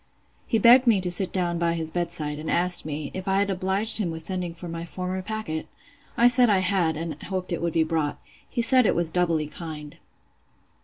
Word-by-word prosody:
He 225 - +1
begged 245 +4 +6
me 220 -4 +5
to 180 -1 +2
sit 185 +1 +3
down 175 -2 0
by 170 -1 +1
his 160 -1 -4
bed 175 -1 -2
side, 150 -3 -2
and 155 - -6
asked 175 -1 +2
me, 150 -1 -5
if 190 +1 -6
I 195 0 +2
had 200 0 +1
obliged 190 +4 0
him 195 -5 -1
with 160 -1 -7
sending 180 -2 -3
for 175 +1 -9
my 165 0 -6
former 185 +2 -5
packet? 205 -6 -5 0.5
I 240 - +6
said 245 -1 +4
I 205 - +4
had, 185 -4 0
and 160 -2 -6
hoped 185 -1 -4
it 170 - -3
would 170 -1 -2
be 165 - +3
brought. 160 -2 -2 0.3
He 235 - -1
said 255 -1 +5
it - - +1
was 170 -1 0
doubly 170 -3 0
kind. 150 -1 -9
175 Hz, 220 wpm, -25 LUFS, 160-195 Hz, 0.5 s, begged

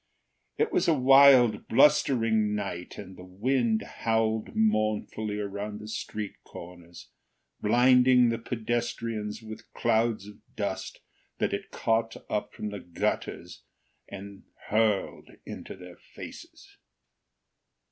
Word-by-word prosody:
It 450 -1 +1
was - - +2
a 165 - +4
wild, 130 -4 +6
blustering 115 -6 +3
night, 95 -4 -5
and 95 -2 -9
the 90 - -12
wind 110 +4 0
howled 110 -1 -1
mournfully 110 -1 0
around 105 +1 -5
the 105 - -9
street 105 -1 -6
corners, 85 0 -12 0.5
blinding 125 +2 +5
the 115 0 -2
pedestrians 115 -2 -3
with 110 0 -8
the 115 - -19
clouds 115 -2 +1
of 105 0 -13 0.2
dust - - -4 0.4
that - - -1
it - - -4
caught 115 0 -1
up 105 - -2
from 105 - -5
the 105 -1 -6
gutters 85 -2 -4 0.5
and 100 0 -9 0.3
hurled 105 -2 0 0.2
into - - -8
their 90 -1 -12
faces. - - -12
110 Hz, 115 wpm, -28 LUFS, 105-115 Hz, 0.5 s, wild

